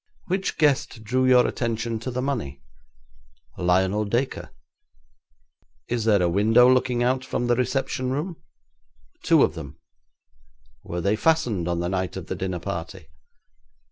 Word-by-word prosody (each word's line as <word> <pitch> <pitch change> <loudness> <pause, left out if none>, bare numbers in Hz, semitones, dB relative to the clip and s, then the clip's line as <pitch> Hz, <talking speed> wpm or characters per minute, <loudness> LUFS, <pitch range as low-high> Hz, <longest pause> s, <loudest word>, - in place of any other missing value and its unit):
'Which 190 +2 -2
guest 140 -6 +1
drew 130 +4 +1
your 125 -1 +6
attention 115 -1 -2
to 115 - -5
the 125 0 -3
money?' 110 - -3 1.0
'Lionel 95 +4 +2
Dacre.' 120 +6 -2 1.4
'Is 120 -2 -1
there 105 -4 +4
a - - +3
window 110 +7 +4
looking 125 -1 +2
out 130 +1 +1
from 125 -2 -2
the 120 0 +2
reception 130 0 -1
room?' 155 +6 -3 0.8
'Two - - +4
of - - +1
them.' 75 -5 -9 1.1
'Were 85 0 -4
they 100 +4 +1
fastened 110 - +1
on 85 -1 -1
the 85 - -1
night 95 -1 -2
of - - -6
the - - -4
dinner 95 -1 -3
party?' 85 -2 -6
115 Hz, 140 wpm, -24 LUFS, 95-130 Hz, 1.4 s, your